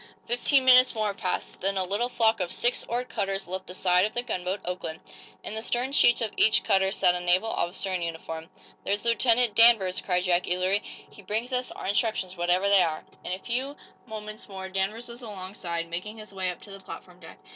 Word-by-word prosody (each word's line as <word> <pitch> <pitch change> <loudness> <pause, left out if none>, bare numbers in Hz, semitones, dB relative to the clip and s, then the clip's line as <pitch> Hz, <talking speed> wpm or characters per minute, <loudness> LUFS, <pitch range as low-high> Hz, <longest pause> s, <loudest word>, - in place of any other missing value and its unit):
Fifteen 260 +3 +2
minutes 255 -1 +6
more 215 -2 0
passed. 185 -2 -4
Then 195 +1 0
a 190 - +1
little 205 +6 -1
flock 225 -3 +2
of 180 -2 -2
six 240 +1 +1
oared 245 +2 -3
cutters 195 -4 -3
left 185 +1 -5
the 180 - -6
side 180 -1 +3
of 215 - -1
the 240 - 0
gunboat 185 -4 -3
"Oakland." 175 -3 -4 0.4
In - - -5
the 220 - -4
stern 245 +3 -1
sheets 240 -4 +5
of 220 -3 -1
each 220 - +4
cutter 190 -2 +2
sat 180 - +3
a 180 - -2
naval 180 +5 +2
officer 185 +2 -2
in 180 - -1
uniform. 165 -1 -6 0.3
"There's 205 +3 -1
Lieutenant 235 -1 +4
Danvers," 220 -6 +5
cried 180 -1 0
Jack, 180 -1 +1
eagerly. 185 +3 +1 0.3
"He - - -14
brings 220 +6 -3
us 250 0 -1
our - - -8
instructions, 200 -2 0
whatever 175 +2 +1
they 200 -1 +6
are." 160 -3 -1 0.2
In - - -4
a - - -2
few 255 +7 -3 0.3
moments 215 0 -8
more 190 -1 -7
Danvers 195 +5 -2
was 240 +1 -9
along 195 -5 -8
side, 170 -4 -4
making 185 +6 -5
his 215 -2 -10
way 190 -1 -1
up 180 - -6
to 205 - -13
the 195 - -9
platform 180 -1 -11
deck. 160 - -13
195 Hz, 215 wpm, -27 LUFS, 180-230 Hz, 0.4 s, minutes